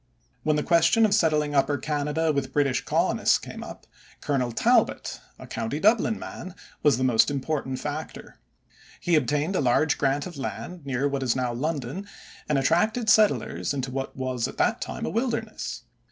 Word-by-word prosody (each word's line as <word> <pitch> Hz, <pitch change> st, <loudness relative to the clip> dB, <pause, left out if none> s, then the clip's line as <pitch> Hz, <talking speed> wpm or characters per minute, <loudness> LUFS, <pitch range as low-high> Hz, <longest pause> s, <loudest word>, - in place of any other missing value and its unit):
When 155 Hz, -1 st, +1 dB
the 150 Hz, -, 0 dB
question 170 Hz, +6 st, +4 dB
of 205 Hz, -, +2 dB
settling 155 Hz, -7 st, +2 dB
Upper 145 Hz, +1 st, +2 dB
Canada 150 Hz, +2 st, -1 dB
with 140 Hz, -2 st, -2 dB
British 140 Hz, -3 st, +1 dB
colonists -, -, +2 dB
came -, -, -9 dB
up, -, -, -10 dB, 0.3 s
Colonel 130 Hz, -4 st, -1 dB
Talbot, -, -, +1 dB, 0.2 s
a -, -, -10 dB
county 125 Hz, +7 st, -3 dB
Dublin 220 Hz, +3 st, +3 dB
man, 185 Hz, +1 st, -8 dB, 0.3 s
was 145 Hz, -5 st, +4 dB
the 130 Hz, -, -1 dB
most 120 Hz, -4 st, +4 dB
important 140 Hz, -1 st, -2 dB
factor. 150 Hz, +3 st, -6 dB, 0.6 s
He 175 Hz, -, -1 dB
obtained 150 Hz, +4 st, +1 dB
a -, -, +2 dB
large 140 Hz, +4 st, +2 dB
grant 140 Hz, +1 st, +1 dB
of 175 Hz, -4 st, -8 dB
land 145 Hz, +3 st, -6 dB
near 135 Hz, +1 st, 0 dB
what 140 Hz, -1 st, -2 dB
is 125 Hz, -3 st, +1 dB
now 125 Hz, -2 st, -1 dB
London 150 Hz, +6 st, -3 dB, 0.4 s
and 150 Hz, -, +2 dB
attracted 215 Hz, -, +2 dB
settlers 210 Hz, -8 st, +2 dB
into 135 Hz, -1 st, -3 dB
what 135 Hz, +1 st, -4 dB
was 130 Hz, -2 st, -2 dB
at -, -, -10 dB
that -, -, +1 dB
time -, -, -4 dB
a -, -, -2 dB
wilderness. 230 Hz, -2 st, -3 dB
145 Hz, 170 wpm, -26 LUFS, 135-170 Hz, 0.6 s, question